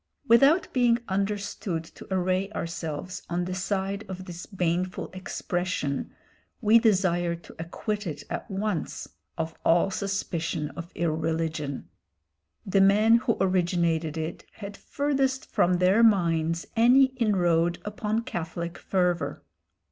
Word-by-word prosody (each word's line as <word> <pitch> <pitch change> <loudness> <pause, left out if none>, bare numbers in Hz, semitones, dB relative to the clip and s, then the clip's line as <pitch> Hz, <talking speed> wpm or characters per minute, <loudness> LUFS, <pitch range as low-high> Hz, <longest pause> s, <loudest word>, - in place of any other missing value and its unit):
Without 275 +9 +5
being 245 -2 +4
understood 200 -3 -2
to 160 - -14
array 185 +1 +1
ourselves 165 +1 -4
on 175 +1 -1
the 185 - -3
side 195 +2 -2
of 190 0 -6
this 175 -1 -8
baneful 180 -1 -2
expression, 175 -6 -3 0.5
we 225 0 +6
desire 180 -6 +2
to 170 - -14
acquit 205 +5 -3
it 145 -3 -5
at - - -5
once 195 -3 -3 0.3
of 160 0 -2
all 170 +3 +3
suspicion 170 -6 -2
of 170 +1 -8
irreligion. 160 -3 -2 0.8
The 195 0 +3
men 210 +4 +6
who 230 -1 0
originated 170 -4 +1
it 160 +1 -4
had 200 -1 -8
furthest 270 -1 -1
from 180 - +2
their 185 +5 +4
minds 165 -6 +3
any 255 +3 +5
inroad 175 -7 +2
upon 210 +2 -2
Catholic 170 -2 -5
fervour. 180 -3 0
185 Hz, 120 wpm, -27 LUFS, 170-205 Hz, 0.8 s, we